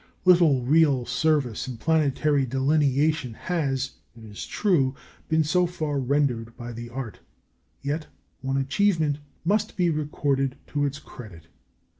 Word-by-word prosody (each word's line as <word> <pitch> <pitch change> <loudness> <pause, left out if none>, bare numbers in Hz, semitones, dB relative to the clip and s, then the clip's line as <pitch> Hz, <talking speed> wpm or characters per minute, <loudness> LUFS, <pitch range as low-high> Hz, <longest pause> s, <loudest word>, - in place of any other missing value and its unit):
Little 170 -8 +5
real 140 -2 +3
service 145 -8 0
in 125 -3 -6
planetary 150 0 +2
delineation 140 0 +1
has, 135 -7 -1 0.3
it 115 - -13
is 105 -2 -8
true, 150 -11 +1 0.3
been 160 0 +3
so 180 +4 +2
far 155 -5 -2
rendered 125 -4 0
by 120 0 -7
the 120 +1 -7
art, 120 -4 -6 0.6
yet 150 +2 -2 0.3
one 135 0 -1
achievement 150 +1 +1 0.3
must 210 +4 0
be 175 -2 +2
recorded 140 -3 -1
to 145 -1 0
its 140 0 -5
credit. 85 - -12
140 Hz, 130 wpm, -25 LUFS, 130-160 Hz, 0.6 s, Little